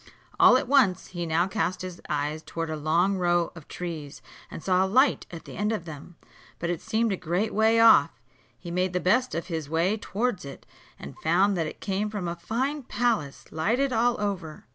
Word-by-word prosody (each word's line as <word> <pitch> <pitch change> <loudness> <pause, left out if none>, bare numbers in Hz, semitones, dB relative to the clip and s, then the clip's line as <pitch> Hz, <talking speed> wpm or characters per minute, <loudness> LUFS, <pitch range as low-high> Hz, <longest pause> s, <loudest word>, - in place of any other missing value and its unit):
All 250 - +8
at 260 - -2
once, 255 -9 +3
he 175 -2 -4
now 165 +2 +2
cast 185 -3 -2
his 180 -1 -7
eyes 150 +1 -2
towards 165 0 -5
a - - -2
long 170 +6 +1
row 175 -1 +1
of 160 -3 -13
trees, 160 -4 -7 0.3
and - - -9
saw 185 0 +3
a - - 0
light 260 +7 +3
at 165 -2 -9
the - - -10
end 210 +2 0
of 210 -7 -3
them, 160 +2 -10 0.4
but 170 +1 -2
it 175 - -4
seemed 220 0 0
a - - 0
great 180 +5 -2
way 220 +1 +3
off. 230 -1 +7 0.5
He 170 - -8
made 180 +1 0
the 180 - +1
best 240 +9 +1
of 165 - -3
his 160 -5 -4
way 170 +7 +1
towards 215 0 -2
it, 140 -1 -10 0.3
and 70 - -10
found 190 +5 +2
that 165 -3 -1
it - - -9
came 200 +2 -1
from 205 -4 -4
a 170 - -3
fine 255 - -2
palace, 230 - -1
lighted 240 +12 0
all 235 +1 +2
over. 185 -7 -4
180 Hz, 205 wpm, -26 LUFS, 165-220 Hz, 0.5 s, All